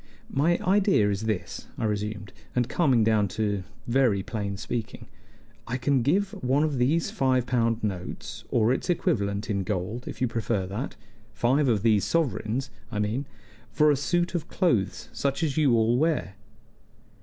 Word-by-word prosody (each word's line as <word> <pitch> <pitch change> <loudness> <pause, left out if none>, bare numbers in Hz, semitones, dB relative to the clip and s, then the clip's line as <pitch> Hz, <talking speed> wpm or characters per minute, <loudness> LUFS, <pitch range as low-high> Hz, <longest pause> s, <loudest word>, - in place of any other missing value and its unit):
"My 165 +5 +2
idea 190 - +3
is 100 +2 -3
this," 105 -5 -3
I - - -1
resumed, 105 -1 -3 0.2
and 125 -1 +2
coming 135 -10 +3
down 110 -2 +3
to 100 -3 0 0.2
very 120 -6 +2
plain 100 -2 -4
speaking: 110 +1 -5 0.6
"I 120 +2 -1
can 135 0 +2
give 190 +10 +1
one 135 +4 +3
of 150 -4 0
these 150 +7 +2
five 130 -2 +1
pound 115 -2 +1
notes, 95 -4 -5
or 115 +1 +3
its 135 - -3
equivalent 100 - 0
in 100 -3 0
gold, 100 +6 -3
if - - -6
you 125 - +2
prefer 115 -4 -1
that 105 +9 -5 0.4
five 130 +6 +2
of 110 -5 +2
these 110 -3 +4
sovereigns, 130 -5 -1 0.2
I 105 - -4
mean 110 +7 -1 0.4
for 150 -1 +4
a - - +3
suit 175 +6 0
of 170 -3 -2
clothes 120 - 0
such 140 +4 -1
as 145 -4 0
you 145 -6 +4
all 115 +1 +3
wear." 155 - 0
120 Hz, 165 wpm, -26 LUFS, 105-140 Hz, 0.6 s, these